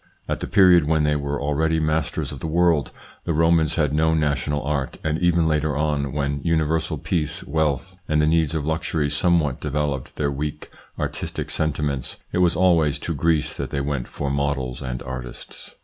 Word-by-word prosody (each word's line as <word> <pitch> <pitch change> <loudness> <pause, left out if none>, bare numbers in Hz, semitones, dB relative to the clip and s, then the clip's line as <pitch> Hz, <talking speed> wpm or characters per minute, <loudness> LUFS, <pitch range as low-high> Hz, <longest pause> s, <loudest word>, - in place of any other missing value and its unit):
At - - -2
the - - -4
period 90 -6 +5
when 80 -1 +2
they 75 0 +2
were 70 0 -2
already 80 +3 +1
masters 80 -1 -1
of - - -7
the - - -4
world, 80 -2 +2 0.4
the 85 - 0
Romans 80 -1 +3
had 75 -3 +1
no 80 +1 +3
national 75 -1 0
art, 70 -1 -2
and 80 0 0
even 85 -2 +3
later 75 -2 0
on, 75 -2 0
when 70 0 -2
universal 80 +1 0
peace, 75 +1 -2
wealth, 80 +3 -1
and 75 0 +2
the 75 - +4
needs 80 -1 +2
of 75 -2 -2
luxury 80 -2 -1
somewhat 75 -2 +2
developed 75 -2 -2
their 70 -1 0
weak, 75 +2 -5 0.3
artistic - - -3
sentiments, 75 -4 -1
it - - 0
was 90 -2 +3
always 85 -5 +3
to - - -4
Greece 80 -2 +1
that 70 - -3
they 70 0 -2
went 70 -3 -2
for 70 -1 -3
models 70 -3 -1
and 65 -2 -4
artists. 65 0 -8
75 Hz, 180 wpm, -23 LUFS, 70-80 Hz, 0.4 s, period